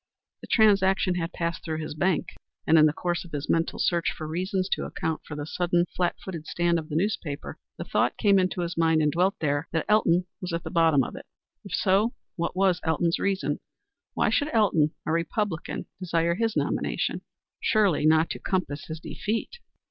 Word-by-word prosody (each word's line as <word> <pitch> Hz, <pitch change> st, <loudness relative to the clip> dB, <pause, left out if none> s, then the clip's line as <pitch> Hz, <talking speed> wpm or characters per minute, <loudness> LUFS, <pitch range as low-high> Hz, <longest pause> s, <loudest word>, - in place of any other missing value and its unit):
The -, -, -10 dB
transaction 195 Hz, -4 st, +4 dB
had 170 Hz, -1 st, -2 dB
passed 170 Hz, -1 st, -3 dB
through 160 Hz, -2 st, -3 dB
his 155 Hz, -1 st, -5 dB
bank, 180 Hz, +4 st, 0 dB, 0.4 s
and 160 Hz, 0 st, +6 dB
in 155 Hz, -, +7 dB
the -, -, +2 dB
course 175 Hz, +2 st, -2 dB
of 175 Hz, -, -14 dB
his 145 Hz, 0 st, -3 dB
mental 165 Hz, 0 st, +1 dB
search 170 Hz, -1 st, +1 dB
for 155 Hz, -, -7 dB
reasons 185 Hz, +3 st, -1 dB
to -, -, -1 dB
account 160 Hz, -1 st, -3 dB
for 145 Hz, -, -8 dB
the 145 Hz, 0 st, -4 dB
sudden 175 Hz, +2 st, +1 dB
flat 175 Hz, -1 st, +1 dB
footed 165 Hz, -5 st, -6 dB
stand 170 Hz, -1 st, +1 dB
of 155 Hz, -, -9 dB
the 150 Hz, -, -4 dB
newspaper, 170 Hz, -5 st, -2 dB, 0.2 s
the -, -, -4 dB
thought -, -, 0 dB
came 200 Hz, -3 st, +4 dB
into 185 Hz, 0 st, 0 dB
his 170 Hz, 0 st, -3 dB
mind 160 Hz, -1 st, +3 dB
and 150 Hz, -, +2 dB
dwelt 180 Hz, +4 st, +2 dB
there 145 Hz, 0 st, 0 dB
that 160 Hz, -, 0 dB
Elton 185 Hz, -4 st, +3 dB, 0.2 s
was 180 Hz, -2 st, -4 dB
at 170 Hz, -, -2 dB
the -, -, -6 dB
bottom 160 Hz, -5 st, +4 dB
of -, -, -6 dB
it. -, -, -10 dB, 0.4 s
If -, -, -9 dB
so, 200 Hz, +5 st, +2 dB, 0.2 s
what 170 Hz, +1 st, -2 dB
was 185 Hz, -2 st, +2 dB
Elton's 165 Hz, +1 st, +1 dB
reason? 165 Hz, -8 st, 0 dB, 0.6 s
Why -, -, +2 dB
should 290 Hz, 0 st, +1 dB
Elton, 185 Hz, -9 st, +3 dB, 0.2 s
a -, -, -1 dB
Republican, 170 Hz, +2 st, -2 dB
desire 170 Hz, -2 st, +1 dB
his 225 Hz, +4 st, -1 dB
nomination? -, -, -1 dB, 0.4 s
Surely 205 Hz, -9 st, +2 dB
not 160 Hz, +1 st, +4 dB
to -, -, -4 dB
compass 170 Hz, -6 st, -2 dB
his 160 Hz, 0 st, -6 dB
defeat. 220 Hz, -, -4 dB
170 Hz, 195 wpm, -26 LUFS, 160-190 Hz, 0.6 s, in